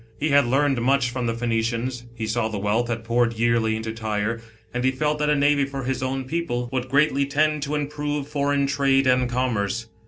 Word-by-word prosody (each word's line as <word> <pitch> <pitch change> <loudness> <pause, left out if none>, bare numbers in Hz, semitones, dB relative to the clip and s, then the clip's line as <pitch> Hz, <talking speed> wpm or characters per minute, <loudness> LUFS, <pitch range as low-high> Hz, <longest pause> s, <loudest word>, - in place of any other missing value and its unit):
He 155 - 0
had 140 -3 +4
learned 135 0 +2
much 130 0 +2
from 125 -1 -2
the 115 - -1
Phoenicians; 115 +1 -2
he 115 -1 -4
saw 110 +1 0
the 110 -2 -4
wealth 105 +4 0
that 115 -1 -3
poured 115 +1 +1
yearly 115 -1 +2
into 110 0 -4
T} 115 - -12
r 105 0 0
re, - - -14 0.3
and 125 0 -2
he 130 - +4
felt 150 +3 -1
thct 150 0 +1
a 150 - +4
navy 145 0 +3
for 135 0 -4
his 130 0 -2
own 130 +1 -2
people, 130 -5 -2
would 130 0 -2
greatly 140 0 +2
tend 150 +1 +1
to 145 +1 -2
improve 145 -1 -3
foreign 140 -1 0
trade 140 -1 +2
and 125 -1 +3
commerce. 115 -3 -1
130 Hz, 220 wpm, -23 LUFS, 115-140 Hz, 0.3 s, had